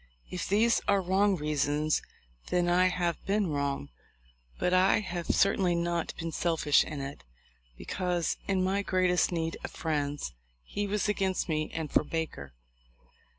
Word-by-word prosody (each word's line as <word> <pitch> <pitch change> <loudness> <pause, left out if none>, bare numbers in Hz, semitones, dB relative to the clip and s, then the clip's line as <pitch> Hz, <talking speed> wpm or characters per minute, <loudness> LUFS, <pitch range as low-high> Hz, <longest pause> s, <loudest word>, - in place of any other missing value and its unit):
If 180 - -4
these 225 +4 +3
are 200 - +4
wrong 190 +2 +2
reasons 150 -1 0 0.5
then 175 -1 +2
I 180 +1 +4
have 175 -2 -1
been 200 -3 +1
wrong; 140 - -2 0.7
but 180 - 0
I 185 +2 +5
have 175 -4 -4
certainly 190 -3 +3
not 170 0 -1
been 165 -1 -4
selfish 160 -3 +3
in 150 -2 -6
it, 140 +1 -7 0.5
because 180 - -1
in 190 -2 +1
my 195 +2 +1
greatest 185 -2 +2
need 165 -1 -2
of - - -4
friends 145 - -2 0.3
he 205 - -3
was 210 +1 0
against 195 -2 0
me 155 -2 -1
and 160 -3 -4
for - - +4
Baker." 150 - -4
175 Hz, 150 wpm, -29 LUFS, 155-190 Hz, 0.7 s, I